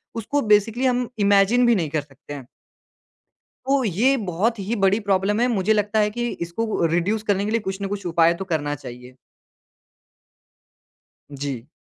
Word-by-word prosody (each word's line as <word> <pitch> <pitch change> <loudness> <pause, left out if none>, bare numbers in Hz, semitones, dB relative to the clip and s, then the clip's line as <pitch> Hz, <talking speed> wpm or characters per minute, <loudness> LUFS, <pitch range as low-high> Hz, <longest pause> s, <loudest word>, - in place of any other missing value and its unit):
उसको 235 +6 -1
बेसिकली 220 +3 +2
हम 250 -1 +1
इमेजिन 205 +4 +4
भी 235 -1 +4
नहीं 165 -6 -1
कर 155 +1 -1
सकते 145 0 -13
हैं। 135 -4 -9 1.2
तो 270 -1 +2
ये 225 +7 +2
बहुत 210 +2 -1
ही 200 +4 -2
बड़ी 195 +3 +3
प्रॉब्लम 200 +1 0
है, 245 - +3
मुझे 215 -2 +1
लगता 210 +1 0
है 210 0 +2
कि 240 +3 -3
इसको 170 +7 -3
अ, 170 - +2
रिड्यूस 200 +6 0
करने 200 -1 0
के 215 - -2
लिए 230 - +1
कुछ 195 -1 -5
न 195 - -2
कुछ 200 -1 -5
उपाय 170 0 +3
तो 190 +3 -6
करना 145 -2 -1
चाहिए। 125 -2 -11 2.2
जी। 135 -3 -5
200 Hz, 175 wpm, -22 LUFS, 170-225 Hz, 2.2 s, इमेजिन